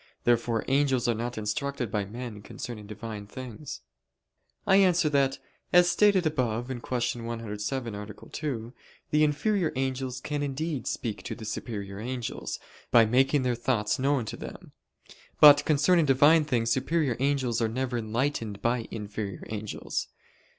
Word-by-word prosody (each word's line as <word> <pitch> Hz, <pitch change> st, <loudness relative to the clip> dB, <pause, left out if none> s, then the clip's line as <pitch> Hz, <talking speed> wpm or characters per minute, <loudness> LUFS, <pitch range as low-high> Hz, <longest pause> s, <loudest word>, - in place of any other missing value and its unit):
Therefore 120 Hz, -1 st, +2 dB
angels 135 Hz, -2 st, +2 dB
are 120 Hz, -, +3 dB
not 120 Hz, +2 st, -4 dB
instructed 120 Hz, +3 st, -2 dB
by 105 Hz, -2 st, 0 dB
men 115 Hz, 0 st, -7 dB
concerning 105 Hz, 0 st, -7 dB
Divine 105 Hz, -1 st, -7 dB
things. 125 Hz, -, -8 dB, 0.8 s
I 195 Hz, -1 st, +5 dB
answer 175 Hz, -5 st, +4 dB
that, 140 Hz, -2 st, +2 dB, 0.3 s
As 180 Hz, 0 st, +6 dB
stated 200 Hz, -4 st, +4 dB
above 125 Hz, -5 st, 0 dB
(Q. 120 Hz, -1 st, -2 dB
107, 115 Hz, +1 st, -4 dB
A. 105 Hz, 0 st, -5 dB
2), 115 Hz, +2 st, -5 dB, 0.4 s
the 150 Hz, 0 st, +4 dB
inferior 160 Hz, +5 st, +1 dB
angels 130 Hz, -1 st, -2 dB
can 145 Hz, +1 st, -3 dB
indeed 145 Hz, +1 st, -3 dB
speak 110 Hz, -3 st, -3 dB
to -, -, -5 dB
the 110 Hz, -, -9 dB
superior 100 Hz, -3 st, -5 dB
angels, 125 Hz, +1 st, -4 dB, 0.3 s
by 115 Hz, -1 st, +6 dB
making 130 Hz, +4 st, +3 dB
their 125 Hz, -1 st, +1 dB
thoughts 115 Hz, -2 st, 0 dB
known 135 Hz, -2 st, +1 dB
to -, -, -5 dB
them; -, -, -9 dB, 0.7 s
but 145 Hz, -1 st, +9 dB
concerning 155 Hz, +3 st, +4 dB
Divine 145 Hz, +4 st, +5 dB
things 115 Hz, -5 st, 0 dB
superior 140 Hz, +1 st, +1 dB
angels 130 Hz, -4 st, +1 dB
are 115 Hz, -, +2 dB
never 125 Hz, +2 st, -2 dB
enlightened 115 Hz, -2 st, -2 dB
by 120 Hz, -1 st, 0 dB
inferior 105 Hz, -3 st, -5 dB
angels. 105 Hz, -1 st, -4 dB
125 Hz, 145 wpm, -28 LUFS, 110-145 Hz, 0.8 s, but